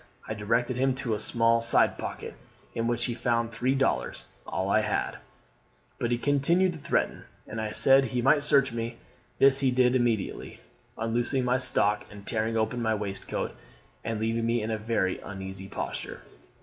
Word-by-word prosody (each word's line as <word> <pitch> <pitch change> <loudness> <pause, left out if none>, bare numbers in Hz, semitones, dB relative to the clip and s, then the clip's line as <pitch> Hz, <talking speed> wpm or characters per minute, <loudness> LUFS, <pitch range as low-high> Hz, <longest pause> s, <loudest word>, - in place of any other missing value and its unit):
I - - -3
directed 115 +4 0
him 130 0 +2
to 125 -4 -2
a 105 - -2
small 115 0 +2
side 115 +1 +3
pocket, - - -6 0.4
in 115 0 -1
which 120 0 +1
he 120 - -1
found 115 -1 0
three 125 +3 0
dollars, 60 - -1 0.2
all - - -2
I - - +3
had; - - -2 0.8
but 120 - -1
he 120 - +1
continued 145 +8 +2
to 160 - -9
threaten, - - -1 0.2
and 110 +1 -5
I 110 - -2
said 135 +5 +5
he 125 0 -2
might 135 +4 +4
search 140 -3 +3
me: 115 0 -4 0.4
this 135 +1 +5
he 135 - +2
did 125 0 +3
immediately, 120 -5 -1 0.4
unloosing 120 +3 0
my 125 +1 +2
stock 105 -4 +3
and 100 -1 -12
tearing 115 0 -1
open 110 +2 -1
my 110 -1 +1
waistcoat, 100 -2 -4 0.5
and 115 -1 -3
leaving 115 +1 0
me 115 -1 +1
in 110 - -2
a 110 - -1
very 105 -4 -1
uneasy 95 -1 -7
posture. - - -5
115 Hz, 175 wpm, -27 LUFS, 110-130 Hz, 0.8 s, said